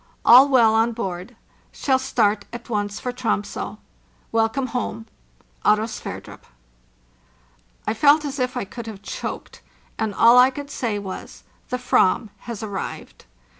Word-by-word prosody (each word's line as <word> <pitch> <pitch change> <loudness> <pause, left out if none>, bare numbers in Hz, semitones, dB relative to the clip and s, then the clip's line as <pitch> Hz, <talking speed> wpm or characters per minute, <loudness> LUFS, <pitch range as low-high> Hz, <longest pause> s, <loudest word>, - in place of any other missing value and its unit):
All 260 +4 +9
well 235 -5 +5
on 225 +1 +2
board. 195 0 -5 0.4
Shall 265 -2 +1
start 215 -6 +1
at 240 0 -9
once 205 -1 -2
for 250 - -4
Troms6. 225 -5 -3 0.5
Welcome 225 +4 +1
home! 225 -2 -3 0.6
© - - +7
Oro: 215 - -2
SVERDRUP: 225 - -8 1.4
I - - 0
felt 290 +6 +4
as 280 -1 -4
if 250 0 -1
I 245 - -2
should 235 -2 -7
have 205 -3 -9
choked, - - -6 0.4
and 215 -3 -1
all 235 +2 +7
[I 255 +1 +7
could 285 +1 -8
say 225 -4 -2
was, 195 -2 -8 0.3
"The 250 - -1
/vam 240 -3 +2 0.2
has 230 -3 -5
arrived!" 200 -3 -6
230 Hz, 145 wpm, -22 LUFS, 210-250 Hz, 1.4 s, All